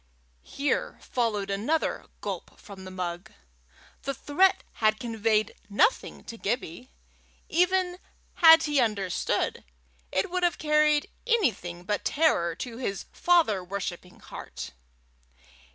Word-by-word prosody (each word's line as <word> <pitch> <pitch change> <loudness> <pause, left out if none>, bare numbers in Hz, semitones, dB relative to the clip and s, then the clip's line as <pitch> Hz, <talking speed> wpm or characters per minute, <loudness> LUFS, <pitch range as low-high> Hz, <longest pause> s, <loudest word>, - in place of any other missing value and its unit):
Here 280 - -2
followed 210 -5 -1
another 235 +12 -1
gulp - - -6
from 195 -2 -11
the - - -7
mug. 180 -1 -5 0.7
The 275 0 -3
threat 375 +8 +2 0.2
had 215 0 +3
conveyed 225 -3 0 0.2
nothing 320 - +1
to 230 -2 -9
Gibbie. 240 +2 -3 0.6
Even 360 +1 +2 0.3
had 325 -1 +8
he 295 -2 +1
understood, 205 -6 0 0.5
it 190 - 0
would 365 0 0
have 350 -1 +2
carried 300 -1 +3 0.2
anything 220 - 0
but 205 +2 -2
terror 170 - +2
to 235 -2 -6
his 200 -6 -3
father 325 - +3
worshipping 180 -1 -6
heart. - - -8
230 Hz, 115 wpm, -27 LUFS, 195-315 Hz, 0.7 s, had